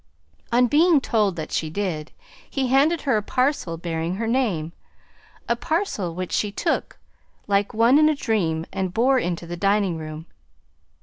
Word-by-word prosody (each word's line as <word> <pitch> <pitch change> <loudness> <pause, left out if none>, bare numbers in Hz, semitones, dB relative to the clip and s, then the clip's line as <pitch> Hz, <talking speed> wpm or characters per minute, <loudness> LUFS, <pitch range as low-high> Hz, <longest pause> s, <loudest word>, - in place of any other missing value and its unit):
On 245 +1 +4
being 310 +5 +4
told 210 -7 +1
that 160 -2 -6
she 160 - -1
did, 160 -4 -3 0.4
he 265 -2 -1
handed 290 +5 +3
her 265 -6 +1
a - - 0
parcel 255 - -1
bearing 165 +1 -3
her 225 +3 -3
name, 220 -10 0 0.8
a 235 - +2
parcel 275 - -2
which 185 0 -4
she 210 - 0
took 325 - -2 0.5
like 200 0 +1
one 235 +5 +4
in 310 0 +5
a 310 - +1
dream 175 - -1
and 190 -2 -3
bore 255 +3 +3
into 175 -5 -3
the 175 +1 -5
dining 195 -3 +1
room. 155 0 -7
205 Hz, 165 wpm, -23 LUFS, 170-260 Hz, 0.8 s, in